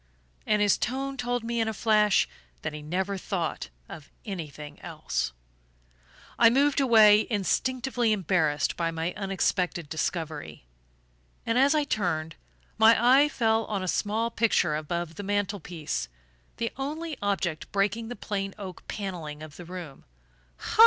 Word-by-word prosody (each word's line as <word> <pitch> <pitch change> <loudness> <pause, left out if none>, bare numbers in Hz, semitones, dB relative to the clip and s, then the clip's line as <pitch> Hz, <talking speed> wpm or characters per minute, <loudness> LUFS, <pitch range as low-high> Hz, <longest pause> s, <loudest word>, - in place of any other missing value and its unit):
And 210 -1 +3
his 205 - +3
tone 270 +3 -2
told 245 -2 -2
me 235 0 -2
in 225 - +1
a 220 - -2
flash 210 -2 +3 0.4
that - - -3
he 150 - -6
never 190 +5 -2
thought 170 - -3 0.2
of 145 - -10 0.2
anything 150 -7 -7
else. 160 - -3 1.1
I 230 - +8
moved 280 +4 +3
away, 220 -4 +6
instinctively 245 +3 0
embarrassed 165 -7 +1
by 165 -1 0
my 165 +1 -2
unexpected 190 -4 -1
discovery; 155 - -3 0.8
and 230 - 0
as 280 +3 +5
I 300 - +3
turned, 165 - -1 0.4
my 220 +1 +7 0.2
eye 295 +1 +4
fell 225 -4 +1
on 200 -3 -2
a - - -3
small 220 +5 0
picture 225 -9 +2
above 165 +2 -3
the - - -4
mantel 205 0 -1
piece 165 - -4 0.5
the 230 -1 -1
only 305 +4 -3
object 185 -6 -1
breaking 205 +3 0
the 245 - -5
plain 195 -1 -3
oak 190 -3 -9
panelling 165 -7 -5
of 155 -2 -10
the 175 - -9
room. 175 -5 -8
200 Hz, 145 wpm, -27 LUFS, 165-230 Hz, 1.1 s, I